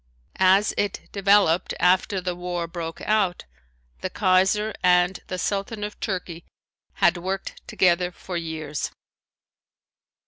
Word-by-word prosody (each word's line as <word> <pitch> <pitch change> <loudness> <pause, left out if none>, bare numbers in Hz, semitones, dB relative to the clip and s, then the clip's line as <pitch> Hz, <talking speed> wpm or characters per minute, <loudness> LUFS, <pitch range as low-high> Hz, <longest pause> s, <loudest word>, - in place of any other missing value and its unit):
As 190 +2 +4
it 205 -2 -1
developed 200 -3 +3
after 185 +2 +3
the 180 -1 -3
war 175 -1 -3
broke 165 -1 -6
out, 205 -4 0 0.5
the - - -3
Kaiser 190 +4 +2
and 180 +1 +3
the 185 - -4
Sultan 200 +3 -2
of 210 0 -6
Turkey 180 -4 -4 0.5
had 175 +1 +3
worked 190 +2 -5
together 180 -1 +2
for 180 +1 -8
years. 160 -3 -4
185 Hz, 115 wpm, -24 LUFS, 175-195 Hz, 0.5 s, As